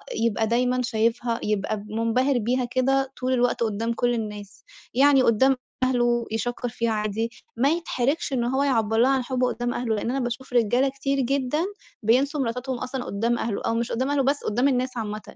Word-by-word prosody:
يبقى 225 -1 +1
دايمًا 250 +2 +1
شايفها 230 0 0
يبقى 210 0 -1
منبهر 235 +4 +1
بيها 245 +3 0
كده 270 +2 +1
طول 255 +1 +1
الوقت 245 -1 +1
قدام 225 +2 -1
كُل 245 +1 +1
الناس، 210 -3 -6 0.3
يعني 275 0 +5
قدام 260 +4 +4 0.3
أهلُه 240 -2 +2
يشكّر 245 +2 -2
فيها 235 -1 -1
عادي، 215 +1 -1 0.3
ما 265 +5 +3
يتحَرَّجش 300 -3 -1
إن 240 -2 +1
هو 265 +3 +1
يعَبَّر 225 -5 +1
لَها 250 +3 +5
عن 265 -2 +1
حُبُّه 255 0 0
قدام 240 0 -2
أهلُه، 230 -3 -1
لأن 210 - -2
أنا 270 - -1
باشوف 245 +1 -4
رجالة 245 +3 +3
كتير 275 0 -2
جدًا 275 +5 0 0.4
بيِنسوا 275 +6 +2
مراتاتهُم 250 +1 -2
أصلًا 255 0 -4
قدام 230 +4 0
أهلُه 220 -3 -2
أو 230 - +1
مش 235 0 -1
قدام 260 +4 -1
أهلُه 280 -2 +2
بس 280 +2 0
قدام 245 +6 +1
الناس 255 -1 0
عامةً، 215 -1 -4
245 Hz, 185 wpm, -25 LUFS, 230-265 Hz, 0.4 s, يعني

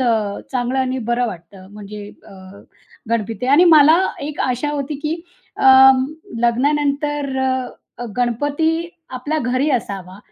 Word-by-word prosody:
अ, 220 -5 0
चांगलं 250 +1 -1
आणि 260 0 -1
बरं 245 +1 +1
वाटतं 185 -1 -10
म्हणजे 210 0 -9 0.2
अ, - - -14 0.8
गणपती. 225 0 -2
आणि 285 +7 +5
मला 310 0 +7 0.3
एक 295 0 -6
आशा 255 +3 -1
होती 290 0 -3
की 310 +1 -1 0.4
अं, 265 0 +6 0.4
लग्नानंतर 285 +3 0 0.6
अ, 245 - -5
गणपती 285 +6 0 0.4
आपल्या 275 +5 -3
घरी 255 +2 0
असावा 195 -7 -4
255 Hz, 120 wpm, -19 LUFS, 230-290 Hz, 0.8 s, मला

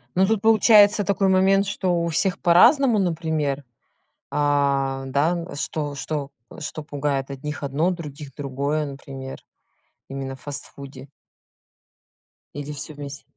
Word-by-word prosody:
Ну, 190 +1 +4
тут 220 -1 +1
получается 215 -1 +6
такой 195 0 +1
момент, 190 +1 +4
что 180 -4 0
у - - -1
всех 185 +4 0
по-разному, 235 - +5
например. 160 -5 -1 0.7
А, 140 -2 +1
да, 140 +5 +1
н 170 -3 -5
что 145 0 -3
что 145 0 -4 0.3
что 155 0 -5
пугает 140 -2 -2
одних 145 +2 -6
одно, 145 +6 0
других 150 -5 -7
другое, 145 +2 -2
например. 135 -1 -8 0.7
Именно 135 -1 -5
в 130 - -19
фастфуде. 140 -1 -8 1.5
Или 145 0 -5
всё 145 +2 -6
вместе? 145 -1 -8
150 Hz, 125 wpm, -23 LUFS, 140-180 Hz, 1.5 s, получается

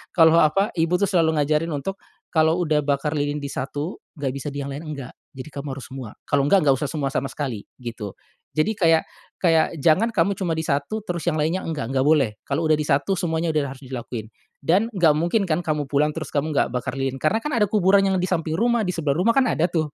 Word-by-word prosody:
kalau 165 -1 +6
apa, 195 +7 +3
ibu 165 +2 +2
tuh 200 +3 +2
selalu 165 -4 +2
ngajarin 150 +2 +1
untuk, 195 +8 -4 0.3
kalau 160 +1 +3
udah 155 -2 +2
bakar 145 0 0
lilin 145 -1 -1
di 140 - -4
satu, 145 +6 -4 0.2
nggak 140 -3 -2
bisa 140 - -5
di 140 0 -4
yang 140 - -5
lain, 150 +3 -7
enggak. 140 -4 -6 0.2
Jadi, 135 +3 -8
kamu 140 +1 -6
harus 135 - -8
semua. 130 -5 -7
Kalau 140 -1 +1
enggak, 190 +2 +4
enggak 140 -2 +4
usah 150 - -1
semua 140 -4 -2
sama 140 - 0
sekali, 130 -8 -4
gitu. 115 -5 -7 0.4
Jadi, 210 +8 +2
kayak 165 -4 +3 0.3
kayak 165 -1 +2
jangan 170 +10 +3
kamu 200 -2 +1
cuma 175 -5 -2
di 160 - -2
satu, 150 +10 -2
terus 175 -2 -3
yang 155 - -1
lainnya 160 +5 0
enggak, 135 -6 -4
enggak 130 - +2
boleh. 140 -6 +3
Kalau 155 +4 -2
udah 155 - +4
di 150 - +1
satu, 145 +7 +2
semuanya 165 -2 -1
udah 145 -3 0
harus 135 - -14
dilakuin. 120 -3 -6 0.3
Dan 185 +10 +2
nggak 175 -9 +3
mungkin 175 +7 +1
kan 165 0 0
kamu 150 -3 -1
pulang, 145 +2 +2
terus 160 - -6
kamu 150 +2 0
nggak 140 -4 0
bakar 125 +1 -3
lilin? 135 -1 -2
Karena 185 +8 +2
kan 300 +6 -4
ada 210 -5 +2
kuburan 200 -1 +4
yang 190 - +1
di 180 - 0
samping 165 -3 -1
rumah, 235 +1 +2
di 185 - -2
sebelah 155 -6 0
rumah, 180 +9 +1
kan 265 - +5
ada 175 -5 +1
tuh, 155 -3 -1
155 Hz, 235 wpm, -23 LUFS, 140-175 Hz, 0.4 s, kalau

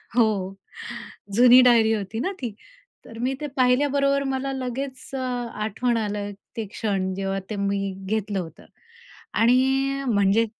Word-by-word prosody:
हो, 240 -2 +6 1.1
जुनी 245 +1 +8
डायरी 230 -3 +5
होती 210 +1 -3
ना 370 +11 -1
ती. 235 -4 -3 0.5
तर 225 - -11
मी 260 +2 0
ते 295 - -2
पाहिल्याबरोबर 275 +2 +3
मला 270 +1 -2
लगेच 260 +1 -4 0.2
अ, - - -2 0.4
आठवण 230 +3 0
आलं 205 -2 -2 0.3
ते 225 - -2
क्षण. 195 -4 -1
जेव्हा 195 0 -2
ते 215 - -3
मी 200 0 0 0.2
घेतलं 205 -1 -1
होतं. 165 -3 -8 0.7
आणि 235 +2 +5 0.5
म्हणजे 205 0 +3
225 Hz, 135 wpm, -24 LUFS, 205-255 Hz, 1.1 s, जुनी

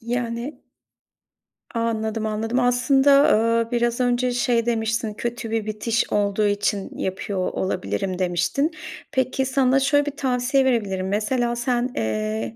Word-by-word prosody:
Yani 235 +3 -4 1.2
Anladım, 220 -1 -1
anladım. 225 +3 -1
Aslında, 270 +3 +4 0.4
eee, - - -23
biraz 240 0 0
önce 245 0 +1
şey 240 -1 +1
demiştin, 225 -1 -1
kötü 235 0 -4
bir 225 -2 -1
bitiş 215 +2 -1
olduğu 205 0 +1
için 205 -1 -1
yapıyor 190 0 -2
olabilirim 185 - -2
demiştin. 180 - 0 0.4
Peki, 260 0 0
sana 265 0 +3
şöyle 290 +1 +2
bir 290 0 -5
tavsiye 265 +1 +1
verebilirim. 200 -7 0
Mesela, 235 +4 0
sen, 240 +1 0
eee, 110 +1 -2
235 Hz, 125 wpm, -23 LUFS, 205-250 Hz, 1.2 s, Aslında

